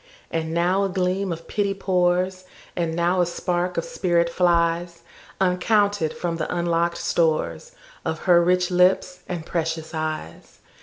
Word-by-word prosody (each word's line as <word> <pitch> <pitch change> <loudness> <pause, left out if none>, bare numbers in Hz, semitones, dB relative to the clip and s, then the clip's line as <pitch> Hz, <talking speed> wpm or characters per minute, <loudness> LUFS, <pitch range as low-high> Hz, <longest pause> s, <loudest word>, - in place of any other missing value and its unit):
And 160 -1 -2
now 175 +4 +2
a 195 - 0
gleam 185 +1 -1
of 165 0 -6
pity 200 -1 -1
pours, 185 -1 0 0.3
And 165 -2 -1
now 175 +2 +2
a - - +3
spark 175 +1 -2
of - - -1
spirit 175 - +1
flies, 170 -1 +1 0.4
Uncounted, 195 -1 +2
from 170 -2 -3
the 160 - -3
unlock'd 170 0 0
storesOf 485 - -2
her 175 -2 +5
rich 180 +1 +2
lips 180 0 +3
and 170 -3 -4
precious 160 -1 -3
eyes. 155 - -5
175 Hz, 140 wpm, -23 LUFS, 170-185 Hz, 0.4 s, her